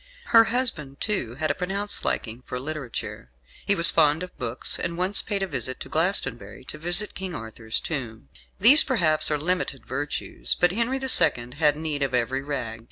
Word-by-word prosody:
Her 230 Hz, 0 st, +8 dB
husband, 200 Hz, -, -2 dB
too, 160 Hz, -, -3 dB
had 155 Hz, +3 st, -1 dB
a -, -, 0 dB
pronounced 200 Hz, +3 st, -2 dB
liking 115 Hz, +2 st, -2 dB
for 125 Hz, -, -4 dB
literature. 135 Hz, -, -6 dB, 0.4 s
He 200 Hz, -, +3 dB
was 170 Hz, -3 st, +7 dB
fond 155 Hz, +1 st, +2 dB
of 180 Hz, -, -10 dB
books, 120 Hz, 0 st, 0 dB
and 170 Hz, 0 st, -4 dB
once 185 Hz, +3 st, +3 dB
paid 200 Hz, -2 st, -2 dB
a -, -, -2 dB
visit 130 Hz, -5 st, -3 dB
to -, -, -8 dB
Glastonbury 135 Hz, -, 0 dB
to 155 Hz, -, -7 dB
visit 175 Hz, +6 st, 0 dB
King 185 Hz, -3 st, -6 dB
Arthur's 110 Hz, -1 st, -4 dB
tomb. 120 Hz, -8 st, -6 dB, 0.3 s
These, 255 Hz, +10 st, +8 dB
perhaps, 170 Hz, -, +2 dB
are 150 Hz, -, 0 dB
limited 170 Hz, -3 st, -2 dB
virtues, 145 Hz, +3 st, -1 dB
but 175 Hz, -1 st, +3 dB
Henry 235 Hz, +6 st, -1 dB
the 265 Hz, 0 st, -4 dB
Second 125 Hz, -, +3 dB
had 150 Hz, 0 st, +2 dB
need 155 Hz, -2 st, -3 dB
of 135 Hz, -2 st, -1 dB
every 125 Hz, +2 st, -1 dB
rag. 130 Hz, -6 st, -5 dB
155 Hz, 185 wpm, -24 LUFS, 130-190 Hz, 0.4 s, Her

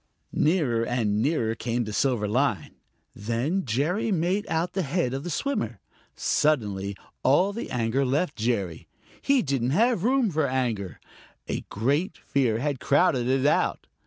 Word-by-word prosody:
Nearer 145 Hz, -9 st, +2 dB
and 110 Hz, -4 st, 0 dB
nearer 115 Hz, -6 st, +1 dB
came 120 Hz, +1 st, -2 dB
the 105 Hz, -1 st, -6 dB
silver 115 Hz, -1 st, +1 dB
line. 110 Hz, -, 0 dB, 0.4 s
Then 120 Hz, -, -1 dB
Jerry 150 Hz, -, 0 dB
made 185 Hz, +3 st, 0 dB
out 165 Hz, +2 st, -1 dB
the 190 Hz, -, 0 dB
head 150 Hz, -4 st, -1 dB
of 135 Hz, +1 st, -3 dB
the 175 Hz, -, -4 dB
swimmer. 145 Hz, -, -2 dB, 0.4 s
Suddenly 100 Hz, -9 st, 0 dB, 0.2 s
all 185 Hz, +9 st, +3 dB
the 230 Hz, -, -5 dB
anger 125 Hz, +2 st, 0 dB
left 140 Hz, +5 st, 0 dB
Jerry. 105 Hz, -7 st, -2 dB, 0.3 s
He 275 Hz, -3 st, +3 dB
didn't 135 Hz, -4 st, 0 dB
have 230 Hz, -4 st, +3 dB
room 250 Hz, -3 st, +2 dB
for 155 Hz, -2 st, +1 dB
anger; 120 Hz, -8 st, -2 dB, 0.5 s
a -, -, -2 dB
great 145 Hz, -, 0 dB
fear 130 Hz, -6 st, 0 dB
had 140 Hz, +1 st, -2 dB
crowded 140 Hz, -4 st, +2 dB
it 130 Hz, +1 st, +1 dB
out. 145 Hz, -, +1 dB
135 Hz, 150 wpm, -26 LUFS, 115-170 Hz, 0.5 s, all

